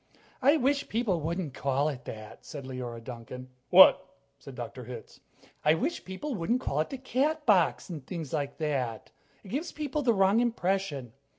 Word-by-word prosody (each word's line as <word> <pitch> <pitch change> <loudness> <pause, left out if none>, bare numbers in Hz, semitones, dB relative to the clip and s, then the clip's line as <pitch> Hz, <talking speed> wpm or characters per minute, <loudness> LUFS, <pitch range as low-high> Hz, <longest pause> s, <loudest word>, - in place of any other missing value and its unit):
"I 280 +4 +5
wish 280 +1 +1
people 215 -7 0
wouldn't 165 -2 -3
call 140 +1 0
it 130 -4 -7
that," 110 -1 -9
said 140 -3 -8
Leora 125 -3 -6
Duncan. 125 +2 -8 0.2
"What?" 185 0 +9 0.4
said 135 - -11
Dr. 125 0 -7
Hitz. 120 -1 -9 0.4
"I 150 +1 +5
wish 300 - -2
people 190 +11 -5
wouldn't 230 +6 0
call 140 - -1
it 155 - 0
'the 270 - -5
Catbox,' 260 - +2
and 150 -6 -7
things 165 -6 -5
like 140 -2 -2
that," 135 -8 -2
she - - -36
said. - - -26
"It - - -10
gives 300 - -3
people 300 0 -2
the 240 -5 +3
wrong 195 +3 +4
impression." 190 - -1
170 Hz, 180 wpm, -29 LUFS, -, 0.4 s, What